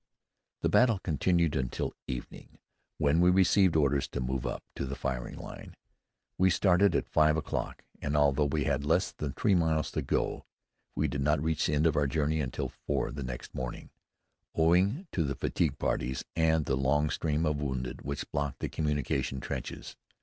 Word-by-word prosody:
The -, -, +2 dB
battle 120 Hz, -4 st, +4 dB
continued 85 Hz, -1 st, +1 dB
until 65 Hz, -2 st, -2 dB
evening, 65 Hz, -2 st, -7 dB, 0.4 s
when 75 Hz, +2 st, +3 dB
we 90 Hz, -, +6 dB
received 95 Hz, -1 st, +4 dB
orders 70 Hz, -2 st, +2 dB
to -, -, -5 dB
move 65 Hz, 0 st, -2 dB
up -, -, -4 dB
to 70 Hz, -, -3 dB
the 70 Hz, -, -4 dB
firing 65 Hz, -3 st, -4 dB
line. -, -, -9 dB, 0.6 s
We 95 Hz, +1 st, +5 dB
started 95 Hz, +2 st, +3 dB
at -, -, 0 dB
five 75 Hz, 0 st, +3 dB
o'clock, 80 Hz, -, -3 dB, 0.2 s
and 75 Hz, +1 st, 0 dB
although 75 Hz, 0 st, +3 dB
we 75 Hz, +1 st, 0 dB
had 70 Hz, +1 st, 0 dB
less 80 Hz, +5 st, +2 dB
than 70 Hz, -3 st, -5 dB
three 105 Hz, -, +2 dB
miles 80 Hz, -3 st, +1 dB
to -, -, -2 dB
go, -, -, -1 dB, 0.5 s
we -, -, +1 dB
did 70 Hz, -, -3 dB
not 75 Hz, +2 st, +2 dB
reach 80 Hz, +1 st, 0 dB
the 75 Hz, -, +1 dB
end 75 Hz, +2 st, +2 dB
of 80 Hz, -2 st, +3 dB
our 75 Hz, -1 st, +2 dB
journey 75 Hz, +2 st, 0 dB
until 65 Hz, -5 st, -2 dB
four -, -, -2 dB
the 70 Hz, -, -6 dB
next 60 Hz, -2 st, -6 dB
morning, 65 Hz, -1 st, -6 dB, 0.6 s
owing 90 Hz, -, +3 dB
to 85 Hz, -, 0 dB
the 70 Hz, -2 st, -2 dB
fatigue -, -, 0 dB
parties 65 Hz, +1 st, -1 dB
and 80 Hz, -2 st, +2 dB
the 65 Hz, -, +1 dB
long 75 Hz, +3 st, +1 dB
stream 80 Hz, 0 st, 0 dB
of 75 Hz, -1 st, 0 dB
wounded 65 Hz, -3 st, -3 dB
which 70 Hz, +1 st, -4 dB
blocked 70 Hz, -1 st, -2 dB
the -, -, -2 dB
communication 75 Hz, -3 st, -1 dB
trenches. -, -, -6 dB
75 Hz, 180 wpm, -30 LUFS, 70-80 Hz, 0.6 s, we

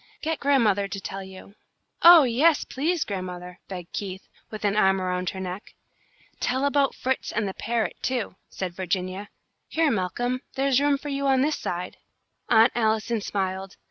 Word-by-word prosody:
Get 320 Hz, -1 st, -1 dB
grandmother 220 Hz, -8 st, +3 dB
to 195 Hz, -, -5 dB
tell 195 Hz, 0 st, -6 dB
you." 190 Hz, +1 st, -12 dB, 0.5 s
"Oh, 340 Hz, -2 st, +10 dB
yes, 275 Hz, +6 st, +3 dB
please, 320 Hz, +5 st, -1 dB
grandmother," 180 Hz, -2 st, -6 dB
begged 180 Hz, -3 st, -8 dB
Keith, 190 Hz, -2 st, -5 dB, 0.2 s
with 215 Hz, -1 st, -6 dB
an 205 Hz, 0 st, +2 dB
arm 190 Hz, -2 st, +4 dB
around 180 Hz, -1 st, -1 dB
her 190 Hz, -, -6 dB
neck. 185 Hz, +2 st, -6 dB, 0.6 s
"Tell 260 Hz, +2 st, 0 dB
about 280 Hz, -1 st, +2 dB
Fritz 260 Hz, 0 st, -2 dB
and 215 Hz, -2 st, -1 dB
the 190 Hz, -, -4 dB
parrot, 225 Hz, -3 st, -2 dB
too," 245 Hz, -7 st, -2 dB
said 185 Hz, -2 st, -5 dB
Virginia. 185 Hz, +2 st, -3 dB, 0.4 s
"Here, 320 Hz, -2 st, +2 dB
Malcolm, 245 Hz, +6 st, -1 dB
there's 270 Hz, 0 st, +2 dB
room 285 Hz, -1 st, +3 dB
on 275 Hz, -2 st, +1 dB
this 300 Hz, +3 st, +1 dB
side 180 Hz, +1 st, -4 dB
for -, -, -25 dB, 0.6 s
you." -, -, +8 dB
Aunt 230 Hz, -, +5 dB
Allison 220 Hz, 0 st, 0 dB
smiled. 190 Hz, -1 st, -3 dB
215 Hz, 165 wpm, -25 LUFS, 190-270 Hz, 0.6 s, Oh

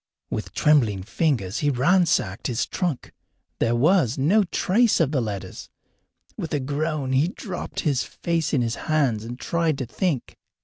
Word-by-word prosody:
With -, -, -4 dB
trembling 115 Hz, -11 st, +3 dB
fingers 120 Hz, -, -1 dB
he 145 Hz, -, +1 dB
ransacked 135 Hz, -, +2 dB
his 120 Hz, -1 st, -1 dB
trunk. 170 Hz, -8 st, -3 dB, 0.5 s
There 115 Hz, +1 st, +2 dB
was 145 Hz, -, +3 dB
no 180 Hz, +11 st, +4 dB
trace 210 Hz, +6 st, +2 dB
of 155 Hz, -4 st, +2 dB
the 135 Hz, -4 st, +1 dB
letters. 105 Hz, -4 st, -6 dB, 0.7 s
With 160 Hz, -, -3 dB
a -, -, 0 dB
groan 145 Hz, 0 st, -2 dB
he 135 Hz, +5 st, +3 dB
dropped 185 Hz, 0 st, -5 dB
his 140 Hz, -5 st, +1 dB
face 165 Hz, -2 st, -2 dB
in 130 Hz, -4 st, +2 dB
his 115 Hz, -1 st, -1 dB, 0.2 s
hands 135 Hz, -9 st, +2 dB
and 120 Hz, +2 st, -7 dB
tried 165 Hz, -3 st, 0 dB
to 130 Hz, -, -3 dB
think. 140 Hz, +2 st, -2 dB
145 Hz, 160 wpm, -24 LUFS, 120-165 Hz, 0.7 s, no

